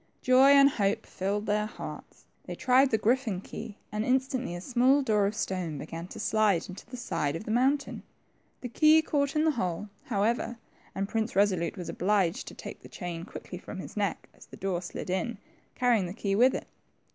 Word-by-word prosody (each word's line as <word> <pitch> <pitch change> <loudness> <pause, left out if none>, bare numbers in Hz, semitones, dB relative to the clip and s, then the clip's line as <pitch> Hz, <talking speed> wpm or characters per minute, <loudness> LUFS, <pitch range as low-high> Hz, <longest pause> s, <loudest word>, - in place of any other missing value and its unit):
Joy 255 +1 +6
and 275 0 +8
hope 205 -7 0
filled 200 +2 -2
their 210 0 +1
hearts; - - -9 0.2
they - - -6
tried 260 +2 +4
the 220 - +2
griffin 225 -2 +1
key, 210 +2 -8
and 210 0 -1
instantly 260 -5 0
a - - -5
small 255 +7 +3
door 210 -5 +2
of 210 - -3
stone 180 -7 -2
began 165 +4 -6
lo - - -14
slide 215 -5 +2
into 185 +2 -10
the 250 +2 -8
side 150 -11 -2
of 165 - -5
the 215 - -4
mountain. 270 +4 +1 0.6
The 250 - -5
key 310 +5 +5
caught 280 -2 0
in 305 - +3
the 320 - +4
hole, 195 - -3 0.2
however, 230 +2 0 0.4
and 195 +1 -1
Prince 220 +1 -1
Eesolute 185 -4 +1
was 180 - -6
obliged 190 -2 0
to - - -8
take - - -9
the - - -13
chain 175 -3 -6
quickly - - -8
from - - -8
his - - -8
neck - - -2
as - - -17
the - - -12
door 185 -3 -2
slid 180 0 -6
in, 195 +5 -1 0.4
carrying 235 -7 +2
the 175 - -7
key 200 -2 -1
with 245 +6 +4
it. - - -4
215 Hz, 200 wpm, -29 LUFS, 190-255 Hz, 0.6 s, and